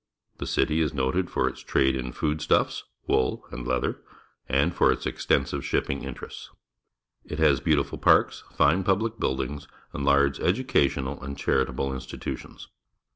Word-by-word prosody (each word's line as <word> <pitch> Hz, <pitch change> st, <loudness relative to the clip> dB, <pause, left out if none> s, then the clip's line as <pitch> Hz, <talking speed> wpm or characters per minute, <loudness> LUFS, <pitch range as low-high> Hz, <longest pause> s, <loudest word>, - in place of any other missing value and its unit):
The -, -, -4 dB
city 80 Hz, +1 st, +1 dB
is 75 Hz, -1 st, 0 dB
noted 70 Hz, +8 st, 0 dB
for -, -, +1 dB
its -, -, -5 dB
trade 65 Hz, 0 st, +2 dB
in 65 Hz, -1 st, -4 dB
food 75 Hz, +4 st, -2 dB
stuffs, 75 Hz, -, +1 dB, 0.2 s
wool, 65 Hz, -, 0 dB
and -, -, -6 dB
leather, 65 Hz, -1 st, -1 dB, 0.5 s
and 70 Hz, +6 st, +2 dB
for -, -, +4 dB
its -, -, -3 dB
extensive -, -, 0 dB
shipping 70 Hz, -, -1 dB
interests. 65 Hz, -3 st, -8 dB, 0.7 s
It 75 Hz, -, -6 dB
has 75 Hz, -4 st, +4 dB
beautiful 70 Hz, -3 st, 0 dB
parks, -, -, +3 dB
fine 90 Hz, +7 st, +3 dB
public 110 Hz, +4 st, 0 dB
buildings, 65 Hz, +2 st, -2 dB, 0.3 s
and 70 Hz, -, -4 dB
large 70 Hz, 0 st, +3 dB
educational 70 Hz, -, +1 dB
and 70 Hz, +1 st, -6 dB
charitable 65 Hz, 0 st, 0 dB
institutions. 65 Hz, -, -7 dB
70 Hz, 145 wpm, -26 LUFS, 65-80 Hz, 0.7 s, for